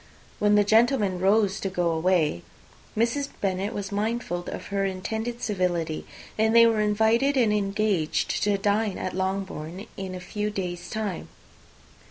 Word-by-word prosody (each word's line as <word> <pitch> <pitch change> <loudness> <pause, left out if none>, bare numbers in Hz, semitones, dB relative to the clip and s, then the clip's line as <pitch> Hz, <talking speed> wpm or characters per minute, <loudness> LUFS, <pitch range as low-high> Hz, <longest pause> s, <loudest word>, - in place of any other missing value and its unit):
When 210 0 +4
the 205 - +5
gentlemen 220 -3 +3
rose 195 +1 +3
to 195 - -2
go 175 -2 0
away, 160 - +1 0.6
Mrs. 240 +5 +1
Bennet 195 +1 -1
was 200 -1 -5
mindful 210 -3 -1
of - - -6
her 200 0 +1
intended 220 +5 -3
civility, 175 -6 -1 0.3
and 220 +1 +3
they 230 0 +9
were 225 -2 +3
invited 220 +6 +2
and 225 -4 +3
engaged 200 -5 0
to 205 -1 +2
dine 205 +1 0
at 185 - -4
Longbourn 190 -1 -3
in 190 -1 -5
a - - -5
few 210 +3 -3
days' 180 -3 -4
time. 210 -5 -3
200 Hz, 150 wpm, -26 LUFS, 185-220 Hz, 0.6 s, they